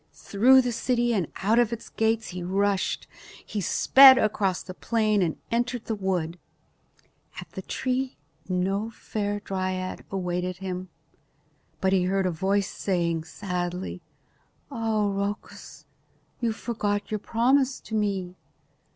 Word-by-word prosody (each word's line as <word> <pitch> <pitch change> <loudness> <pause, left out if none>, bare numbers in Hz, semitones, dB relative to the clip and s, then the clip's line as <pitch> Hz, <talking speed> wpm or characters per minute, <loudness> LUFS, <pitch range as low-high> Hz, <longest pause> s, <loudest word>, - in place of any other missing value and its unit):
Through 255 +6 +4
the 245 - -1
city 240 0 +1
and 185 -8 0 0.2
out 220 +4 +4
of 240 -2 +3
its 235 -1 -5
gates 225 0 0
he 180 0 -6
rushed. 195 +2 0 0.4
He 210 - -3
sped 265 +8 +8
across 200 -5 +1
the 185 - -8
plain 215 0 +1
and 165 -4 0
entered 240 0 -1
the 225 - -2
wood. 180 -4 -2 1.0
At - - -10
the - - -6
tree 255 0 -2 0.3
no 195 +4 0
fair 205 -2 -3
dryad 185 -2 -3
awaited 180 -1 -2
him. 185 -1 -5 0.9
But 190 0 +2
he 185 -2 +3
heard 195 +1 +1
a 185 - +1
voice 195 +4 0
saying 170 -4 -1
sadly, 180 0 -4 0.7
"Ah, 225 -4 0
Rhoecus, 200 +1 -4 0.5
you 235 -2 0
forgot 210 -3 -2
your 215 - -1
promise 260 +5 +2
to - - -11
me. 195 -4 -1
200 Hz, 135 wpm, -26 LUFS, 185-225 Hz, 1.0 s, sped